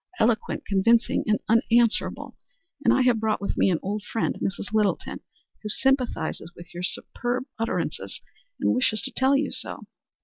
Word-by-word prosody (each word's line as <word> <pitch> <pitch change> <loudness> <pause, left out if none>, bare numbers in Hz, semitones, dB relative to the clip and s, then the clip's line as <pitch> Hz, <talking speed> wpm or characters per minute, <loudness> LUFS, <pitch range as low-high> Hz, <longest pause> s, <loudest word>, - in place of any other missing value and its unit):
Eloquent, 230 -4 +1
convincing, 225 +4 +3
and 215 0 +3
unanswerable. 230 0 +2 0.5
And - - +5
I - - +4
have 245 -3 +3
brought 215 -1 0
with 200 - -2
me - - +3
an 175 - +2
old 205 +2 -2
friend, 225 +2 -2
Mrs. 200 +2 -3
Littleton, 210 -2 0 0.4
who 215 - -5
sympathizes 250 - 0
with 175 0 -13
your 175 - -5
superb 240 +6 -2 0.2
utterances, 225 - -2 0.4
and - - +2
wishes 230 -4 +1
to 265 - -2
tell 265 +2 +3
you 290 - -1
so." - - -4
225 Hz, 160 wpm, -25 LUFS, 205-245 Hz, 0.5 s, And